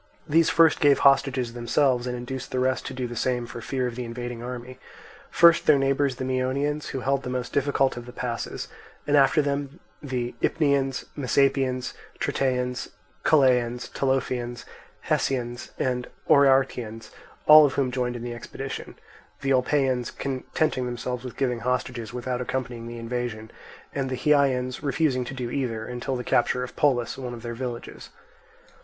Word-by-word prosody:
These 165 +1 +4
first 165 -1 +5
gave 145 -2 +5
hostages 135 -3 +3
themselves, 120 +1 +1
and 125 0 -3
induced 130 +2 -6
the - - -3
rest 130 0 0
to - - -5
do 130 -1 -2
the 120 0 -6
same 120 +1 0
for 120 0 -8
fear 130 +2 -2
of 125 - -3
the 125 - -4
invading 120 0 -6
army; 125 +1 -7 0.5
first, 170 0 +5
their 150 - +7
neighbours 135 0 +1
the 130 - -5
Myonians, 135 +3 -1
who 135 - -4
held 135 +1 +1
the 125 - -6
most 125 -1 -3
difficult 140 -1 +2
of 120 0 -7
the - - -8
passes, 120 -1 -4 0.4
and 145 - +2
after 145 +2 +5
them 140 +2 -3 0.2
the 125 -4 -3
Ipnians, 140 -4 +1
Messapians, 130 -1 +1 0.3
Tritaeans, 125 -2 -1 0.3
Chalaeans, 125 -5 +3
Tolophonians, 125 -3 -1 0.4
Hessians, 120 -2 -1
and 125 -1 -1 0.2
Oeanthians, 130 -5 +3 0.3
all 155 0 +10
of 135 - -4
whom 135 -3 +1
joined 125 -1 -1
in 120 - -6
the 120 0 -4
expedition; 135 +3 -7 0.5
the 135 -1 +1
Olpaeans 130 -1 +1
contenting 135 0 -2
themselves 125 +1 -4
with 125 - -8
giving 125 -3 0
hostages, 125 -1 -2
without 125 0 -3
accompanying 125 -2 -4
the 120 0 -7
invasion; 115 -2 -4 0.4
and 135 -2 -2
the 130 - -2
Hyaeans 130 -3 +2
refusing 140 -2 +1
to 135 - -6
do 125 -2 -4
either, 115 -5 -2
until 125 +2 -3
the 125 - -3
capture 120 +1 +1
of 125 - -8
Polis, 130 -4 +1
one 125 -2 -5
of 115 - -11
their 120 -1 -4
villages. 120 0 -6
130 Hz, 160 wpm, -25 LUFS, 120-135 Hz, 0.5 s, all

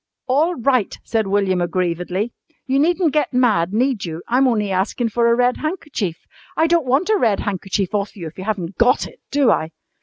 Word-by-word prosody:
"All 300 +7 +2
right," 250 -4 +1
said 220 -2 -1
William 195 -2 +1
aggrievedly. 180 +4 -2 0.3
"You 270 0 +1
needn't 340 +1 +2
get 300 -4 0
mad, 210 -9 +2
need 240 0 0
you? 165 -1 -5
I'm 260 +3 +3
only 210 -5 0
askin' 200 +5 0
for 235 +2 +1
a - - +4
red 245 +1 +2
handkerchief. 300 - -4 0.3
I 320 - +4
don't 330 -4 +2
want 275 +10 +2
a 430 - +4
red 215 -4 +2
handkerchief 195 0 -2
off 200 -1 -2
you 180 -5 -7
if 160 +3 -9
you - - -5
haven't 195 -4 -3
got 245 +2 +3
it, - - -13
do 285 -3 +3
I?" 160 - 0
225 Hz, 195 wpm, -20 LUFS, 190-270 Hz, 0.3 s, a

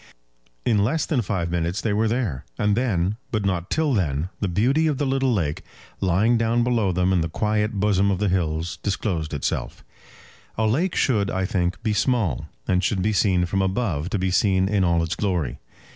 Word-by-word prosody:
In 105 -4 +3
less 145 +8 0
than 145 -7 0
five 90 -5 -2
minutes 85 +2 -1
they 110 - -1
were 110 +2 +2
there; 110 - -1
and 105 -1 +2
then, 105 -5 0
but 105 -3 -1
not 90 -2 -1
till 155 -3 +1
then, 80 - 0
the 100 - 0
beauty 130 - +2
of 150 -3 0
the 145 - 0
little 135 -1 +1
lake, 80 -9 -1 0.4
lying 100 +6 +2
down 115 +1 +2
below 115 -5 +1
them 90 +1 +1
in 90 - +2
the 80 - -2
quiet 105 +5 0
bosom 100 -1 +2
of 95 - +1
the 105 +2 0
hills, 85 -2 -1
disclosed 90 -6 -2
itself. 75 - -3 0.7
A 110 - +1
lake 155 - +1
should, 105 -7 +2
I 95 0 -1
think, 90 +2 -1
be 110 -2 +1
small, 105 - 0 0.2
and 90 0 +2
should 95 -3 0
be 110 +2 +1
seen 95 -3 +2
from 95 +2 0
above, 95 -5 -1
to 105 - -1
be 95 0 -1
seen 95 0 +2
in 100 -1 +1
all 85 -1 +2
its 80 0 -2
glory. 85 -10 -2
100 Hz, 200 wpm, -23 LUFS, 90-110 Hz, 0.7 s, In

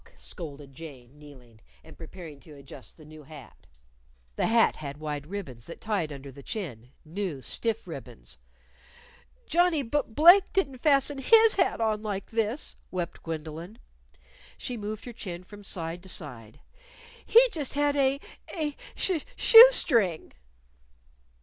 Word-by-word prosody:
scolded 145 -5 -9
Jane, 140 -3 -12
kneeling, 125 -7 -16 0.2
and 160 - -15
preparing 165 -3 -11
to 150 - -15
adjust 140 -1 -12
the 155 - -15
new 155 0 -13
hat. 150 -3 -14 0.7
The - - 0
hat 230 0 +3
had 140 -2 -7
wide 150 -1 -5
ribbons 140 - -8
that 170 - -9
tied 195 -8 -2
under 140 -1 -9
the 140 +2 -13
chin 130 - -7 0.2
new, 170 -2 -4
stiff 225 -1 -2
ribbons. - - -10 1.1
"Johnnie 340 -3 +2
Bu 290 +5 0
Blake 340 - +5
didn't 275 -10 -1
fasten 280 0 +2
his 450 - +6
hat 365 -10 +1
on 215 -2 0
like 205 -3 -5
this," 225 +4 -2
wept 175 -2 -5
Gwendolyn. 165 +5 -7 0.8
She 250 - -5
moved 215 -1 -6
her 245 - -8
chin 180 -5 -7
from 205 +2 -13
side 170 -2 -5
to 190 - -13
side. 120 -11 -4 0.6
"He 480 +2 +6
just 295 - -4
had 290 0 +1
a 275 0 +2 0.4
a 300 -4 -3 0.2
sh 360 -5 0
shoe 465 0 +10
string." 220 - +2
190 Hz, 145 wpm, -27 LUFS, -, 1.1 s, shoe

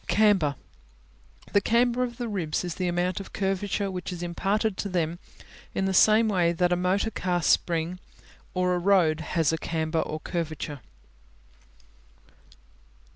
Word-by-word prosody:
Camber 195 -9 +3 1.0
The 200 - +5
camber 240 +3 +2
of 240 -1 -2
the 240 - -3
ribs 180 -8 -2
is 175 -2 -3
the 185 0 -2
amount 175 +1 0
of 195 - -9
curvature 195 0 -1
which 180 0 -5
is 175 -1 -5
imparted 195 +5 0
to 200 - -3
them 170 -2 -1 0.6
in 195 - 0
the 190 - 0
same 215 +4 +5
way 175 -5 +2
that 180 +1 +2
a - - +3
motor 185 +5 0
car 180 -3 -1
spring 170 +3 +1 0.6
or 180 0 +2
a 180 - 0
road 175 -4 +3
has 160 0 0
a 160 - -1
camber 160 +1 -1
or 155 0 -3
curvature. 155 -4 -4
180 Hz, 150 wpm, -26 LUFS, 170-200 Hz, 1.0 s, The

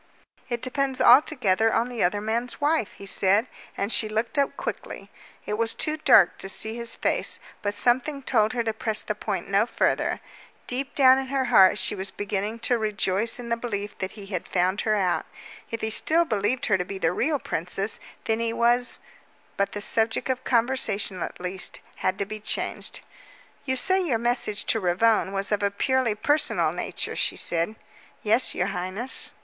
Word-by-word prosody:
"It 240 -1 -3
depends 265 0 -1
altogether 235 -5 +4
on 230 +2 +1
the 245 -2 -2
other 195 +4 +1
man's 230 +3 -3
wife," 295 -6 0
he 200 - -12
said, 200 +3 +2 0.3
and 200 +3 -1
she 215 - +1
looked 220 +4 -2
up 280 -1 0
quickly. - - -6 0.3
It 210 +1 -3
was 230 0 +1
too 305 - 0
dark 310 - +5
to 195 - 0
see 220 +3 +1
his 235 -1 -1
face, - - +1 0.2
but 205 0 -2
something 260 +6 0
told 220 -4 +2
her 240 -2 -1
to 225 -1 -2
press 220 0 +1
the - - -2
point - - -4
no - - +2
further. - - 0 0.5
Deep 260 +2 -4
down 260 -1 +6
in 265 - -4
her 265 0 -1
heart 190 +1 +7
she 190 - +1
was 190 0 -3
beginning 205 +3 -3
to 240 0 +1
rejoice 210 0 0
in 240 -1 -8
the 235 - +1
belief 210 -3 -5
that 190 - -4
he 205 -2 -10
had 190 -3 -5
found 185 +2 0
her 215 -1 +1
out. 185 -4 0 0.4
If 230 - -5
he 220 - -2
still 330 +9 +2
believed 220 0 -1
her 205 -4 +2
to - - 0
be 195 +2 -7
the 165 -4 +1
real 295 - 0
princess, 195 - -1 0.3
then 220 0 0
he 230 0 -1
was 240 +2 +2 0.5
but 200 0 -1
the 205 - -4
subject 220 +4 +2
of 260 0 -1
conversation, 225 -6 0
at - - -5
least, 180 +1 -4 0.2
had 185 - -1
to 200 - -2
be 215 +2 -7
changed. 210 - -3 0.6
"You 260 -2 0
say 375 +8 +2
your 270 -10 0
message 235 -3 -1
to 225 - -1
Ravone 195 +2 +2
was 195 +1 -2
of 210 - +1
a 200 - +2
purely 250 +2 0
personal 295 +8 +2
nature," - - -4
she - - -1
said. 170 +5 +1 0.5
"Yes, 225 +4 +3
your 180 +2 0
highness." 185 +8 -3
220 Hz, 190 wpm, -25 LUFS, 200-250 Hz, 0.6 s, heart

